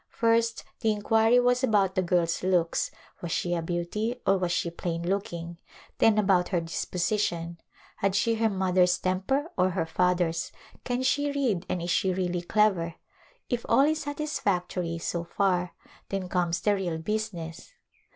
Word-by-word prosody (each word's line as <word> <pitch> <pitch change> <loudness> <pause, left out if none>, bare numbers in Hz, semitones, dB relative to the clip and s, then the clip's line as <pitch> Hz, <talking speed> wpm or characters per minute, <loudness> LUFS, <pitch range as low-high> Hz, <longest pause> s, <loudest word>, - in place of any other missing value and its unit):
First 230 0 +1 0.2
the 225 - +2
inquiry 225 +3 +3
was 245 +1 +2
about 205 -6 +3
the 185 - +1
girl's 170 -2 +1
looks 180 -3 +1 0.2
— - - -29
was 170 - -4
she 175 0 0
a 170 - 0
beauty 175 +8 -2
or 195 0 +3
was 180 -1 -1
she 170 -1 0
plain 170 0 -3
looking, 170 -3 -3 0.2
— - - -24
then 220 -1 +5
about 190 -4 +3
her 180 - +1
disposition, 170 +1 -2 0.4
had 195 -1 0
she 230 +3 +2
her 225 0 +2
mother's 185 -2 +2
tem 185 0 -1
per 275 - -1
or 185 +1 +4
her 175 -3 -1
father's; 175 -1 0 0.3
can 245 +1 -1
she 285 +2 +1
read 245 -11 -1
and 175 - -2
is 175 - -2
she 190 - +2
really 180 -1 -1
clever? 175 -3 +1 0.5
If 240 -2 -2
all - - +5
is 310 +2 +2
satisfactory 190 - -2
so 170 +1 -3
far 180 0 0 0.3
then 195 -2 -3
comes 175 -2 0
the 210 - +3
real 180 -5 -2
business. 175 - -4
185 Hz, 170 wpm, -27 LUFS, 175-220 Hz, 0.5 s, then